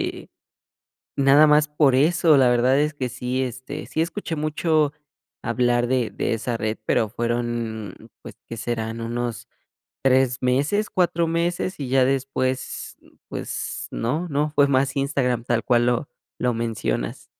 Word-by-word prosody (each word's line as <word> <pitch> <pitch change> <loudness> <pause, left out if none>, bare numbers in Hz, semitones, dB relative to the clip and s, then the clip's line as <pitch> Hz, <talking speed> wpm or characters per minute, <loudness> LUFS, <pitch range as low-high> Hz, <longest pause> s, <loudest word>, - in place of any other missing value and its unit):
este, - - -6 0.9
nada 140 +2 +6
más 150 0 +4
por 150 -3 +3
eso, 160 +2 +4
la 130 -2 +5
verdad 125 +3 +3
es 150 +1 +1
que 130 -4 -3
sí, 125 +1 -2
este, 130 0 -5
sí 160 - -1
escuché 170 -1 -4
mucho 155 0 +1 0.5
hablar 120 0 +1
de 125 -2 0
de - - -1
esa 115 +1 -2
red, 110 0 -2
pero 110 - +1
fueron, 120 -2 -3 0.3
pues, - - -10
¿qué 115 - -6
serán?, 115 0 -3
unos 120 0 -4 0.6
3 130 -1 +3
meses, 145 +12 +1
4 175 -2 +1
meses, 170 +2 -1
y 140 - -3
ya 130 0 +3
después, 130 0 -2
mm, - - -22 0.2
pues, - - -5
no 150 +10 -2
no, 150 0 0
fue 145 -1 +4
más 135 0 +1
Instagram 130 -4 0
tal 115 -2 0
cual 120 0 +3
lo 125 +3 0 0.3
lo 125 -1 +1
mencionas. 110 - -3
130 Hz, 150 wpm, -23 LUFS, 120-150 Hz, 0.9 s, nada